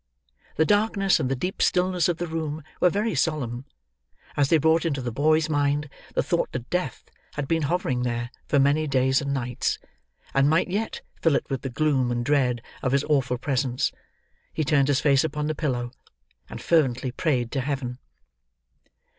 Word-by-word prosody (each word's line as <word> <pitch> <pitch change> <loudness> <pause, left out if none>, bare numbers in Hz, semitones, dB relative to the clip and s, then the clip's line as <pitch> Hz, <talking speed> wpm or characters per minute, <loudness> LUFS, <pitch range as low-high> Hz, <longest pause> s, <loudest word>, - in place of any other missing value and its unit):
The 160 - +3
darkness 205 0 +2
and 130 - -1
the 135 - +1
deep 180 +9 -3
stillness 180 -1 +2
of 170 - 0
the 175 - -2
room 160 -2 -4 0.2
were 180 - +5
very 210 +5 -1
solemn; 130 -6 -1 0.7
as 140 -2 +2
they 165 - +5
brought 160 +2 +3
into 150 -5 -1
the 125 -2 -3
boy's 155 +5 +2
mind 145 -1 0 0.3
the - - +2
thought - - 0
that 125 -1 -6
death 180 0 -2 0.3
had 145 -2 -3
been 165 +1 +1
hovering 140 -5 0
there, 120 0 -2 0.2
for 145 - +2
many 145 +3 +3
days 130 0 +2
and 140 -1 -2
nights, 125 -2 -1 0.6
and 135 +1 +4
might 160 +4 +2
yet 210 +4 -2 0.2
fill 165 -4 +3
it - - -1
with 135 -3 -1
the 135 - -4
gloom 130 -2 +1
and 120 0 -1
dread 125 -4 +1 0.2
of 130 - 0
his 140 0 +3
awful 135 -5 +1
presence, 130 -1 0 0.6
he 155 - -1
turned 140 -2 +3
his 145 0 +2
face 140 -2 +4
upon 150 -1 -2
the 155 - 0
pillow, 125 -6 -2 0.6
and - - -8
fervently 130 -6 +2
prayed 125 -4 0
to 135 - -1
Heaven. 130 -2 -3
145 Hz, 180 wpm, -25 LUFS, 130-160 Hz, 0.7 s, were